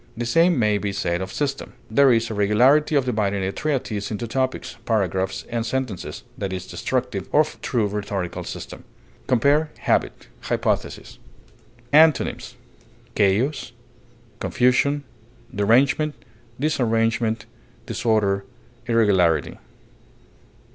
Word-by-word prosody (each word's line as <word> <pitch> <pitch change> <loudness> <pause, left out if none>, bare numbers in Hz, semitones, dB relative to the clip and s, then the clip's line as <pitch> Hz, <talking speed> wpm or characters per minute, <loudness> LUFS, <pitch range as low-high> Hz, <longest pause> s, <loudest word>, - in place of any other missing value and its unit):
The 120 - -2
same 165 +7 +3
may 105 -3 +2
be 100 -1 -2
said 85 -2 -1
of 95 0 -5
system. 140 -2 -3 0.2
There 135 +3 +5
is 115 -1 +1
a - - -2
regularity 125 +10 +3
of 140 -3 +3
dividing 100 -5 0
a 95 - -1
treatise 125 -7 -2
into 110 +2 -4
topics, 130 +2 -2
paragraphs, 95 -4 -1
and 115 -1 -2
sentences, 125 -4 -4 0.2
that 100 -3 -3
is 90 -1 -5
destructive 125 -7 -3
of 155 +1 +1
true 115 -4 0
rhetorical 100 -3 -4
system. - - -8 0.4
Compare 145 +5 +3
HABIT; - - 0
HYPOTHESIS. - - -2 0.7
Antonyms: 145 -5 +3 0.6
chaos, 110 +9 +1 0.7
derangement, 125 +1 +1 0.4
disarrangement, 115 -5 0 0.4
disorder, 105 -4 0 0.4
irregularity. 100 -8 +2
115 Hz, 105 wpm, -23 LUFS, 100-130 Hz, 0.7 s, There